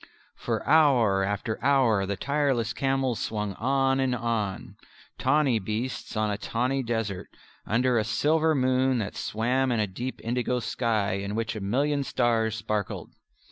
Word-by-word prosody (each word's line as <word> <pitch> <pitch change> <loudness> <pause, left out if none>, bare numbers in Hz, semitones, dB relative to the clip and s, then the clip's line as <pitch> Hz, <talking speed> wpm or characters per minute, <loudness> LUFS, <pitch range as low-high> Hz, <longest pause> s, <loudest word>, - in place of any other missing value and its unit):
For - - -3
hour 125 -11 +4
after 105 +3 -3
hour 125 -8 +3
the 100 - -1
tireless 135 -5 0
camels 135 -3 0
swung 105 -2 -3
on 135 +4 +1
and 130 -2 +1
on, 115 -5 -3 0.4
tawny 135 -3 +2
beasts 110 +4 -4
on 110 -1 +1
a 100 - -3
tawny 125 +5 -1
desert, 115 -6 -3 0.4
under 120 +2 +2
a - - +1
silver 155 +8 +2
moon 130 0 +2
that 105 -3 -3
swam 125 +4 0
in 115 - +1
a 105 - +2
deep 120 +7 -6
indigo 125 +1 -1
sky 110 -4 0
in 100 +1 -4
which 115 0 -2
a 110 - -5
million 140 +8 0
stars 115 -4 +1
sparkled. 105 -2 -3
120 Hz, 150 wpm, -27 LUFS, 110-130 Hz, 0.4 s, hour